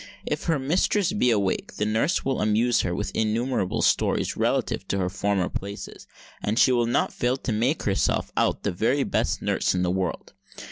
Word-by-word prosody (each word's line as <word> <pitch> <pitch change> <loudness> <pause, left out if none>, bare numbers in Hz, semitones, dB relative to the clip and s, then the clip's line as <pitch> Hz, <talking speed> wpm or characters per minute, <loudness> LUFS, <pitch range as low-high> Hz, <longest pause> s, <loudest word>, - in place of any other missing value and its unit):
If - - -3
her 165 -3 +2
mistress 175 +7 +1
be 165 -12 +2
awake, 100 -5 0
the 105 - -1
nurse 115 - 0
will 135 0 0
amuse 110 +3 +2
her 90 -1 -2
with 105 +2 -3
innumerable 110 -2 0
stories - - +1
relative 95 - -1
to 100 - -1
her 90 -2 0
former 100 -1 0
places; 100 +1 -7 0.3
and 105 +2 -1
she 130 - +5
will 120 -2 +2
not 120 - 0
fail 125 +2 0
to 130 - -4
make 120 +8 0
herself 100 -2 0
out - - +1
the - - 0
very 120 +10 +1
best - - -1
nurse - - +1
in 90 - 0
the 90 - +1
world. 95 -1 -3
110 Hz, 190 wpm, -25 LUFS, 100-130 Hz, 0.3 s, she